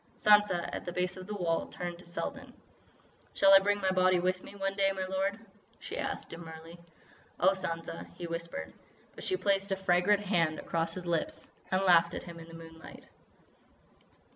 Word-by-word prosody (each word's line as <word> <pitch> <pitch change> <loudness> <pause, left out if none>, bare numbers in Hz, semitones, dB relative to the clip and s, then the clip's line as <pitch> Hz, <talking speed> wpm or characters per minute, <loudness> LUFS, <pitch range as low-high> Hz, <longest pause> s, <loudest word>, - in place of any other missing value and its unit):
Sansa, 210 -4 +5
at - - -4
the - - -2
base 180 +1 -1
of 185 0 -9
the 210 - -4
wall, 170 -4 0
turned 175 -1 -6
to 180 - -14
Selden. 175 - -5 0.8
"Shall 195 0 +6
I 195 - +11
bring 205 +1 +1
my 190 0 +2
body 185 0 +4
with 185 +1 0
me, - - -12
one 195 0 -2
day, 195 -1 +3
my 190 -1 -3
lord?" 190 +2 -1 0.4
she - - -6
asked - - -4
demurely. 165 0 -10 0.6
"Oh, 190 - +5
Sansa——" 165 -3 -5
he 175 - -6
whispered, 170 +9 -5 0.4
but - - -10
she 375 - 0
placed 200 - +1
a - - +3
fragrant 190 +2 +3
hand 165 -6 +1
across 165 0 -2
his 185 -1 -6
lips 170 -2 -2 0.2
and 190 +1 +2
laughed 170 -2 +5
at - - -5
him 170 -1 -9
in 165 - -11
the 165 - -11
moonlight. 165 0 -12
180 Hz, 185 wpm, -31 LUFS, 170-195 Hz, 0.8 s, I